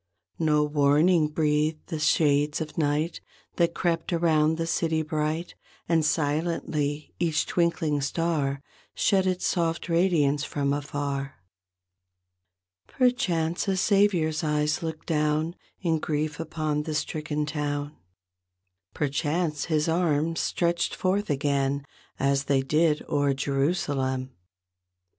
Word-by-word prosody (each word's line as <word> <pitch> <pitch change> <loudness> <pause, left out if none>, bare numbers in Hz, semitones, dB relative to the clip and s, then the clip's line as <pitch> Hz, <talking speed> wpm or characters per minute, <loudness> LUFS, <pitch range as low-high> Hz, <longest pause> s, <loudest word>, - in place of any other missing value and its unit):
No 150 -2 +3
warning 150 +3 +3
breathed 155 0 0
the 160 -3 -3
shades 150 -1 +2
of 155 -2 -5
night 155 +2 0 0.4
That 170 -1 +2
crept 165 0 -1
around 160 -2 +2
the 165 - -1
city 160 -1 0
bright, 155 +2 -2 0.3
And 165 -2 +2
silently 150 -1 -1
each 165 -3 +1
twinkling 165 -4 0
star 140 -2 -1 0.3
Shed 190 -2 +2
its 185 -1 -1
soft 165 -2 0
radiance 165 -5 +2
from 140 -1 -1
afar. 140 -1 -3 1.5
Perchance 180 -10 +1
a 190 -1 +1
Savior's 180 -6 +2
eyes 150 0 0
looked 160 -1 -5
down 155 +1 0 0.3
In 165 -4 +1
grief 150 0 -2
upon 155 -2 -2
the 155 0 -4
stricken 150 0 -2
town. 145 -1 -3 1.0
Perchance 150 +2 -1
His 155 -1 +1
arms 165 -1 +1
stretched 170 0 0
forth 195 +3 0
again 140 -1 0 0.3
As 140 +1 +1
they 135 -1 +2
did 150 +2 +2
o'er 145 -1 +1
Jerusalem. 135 -2 -1
155 Hz, 110 wpm, -26 LUFS, 145-165 Hz, 1.5 s, No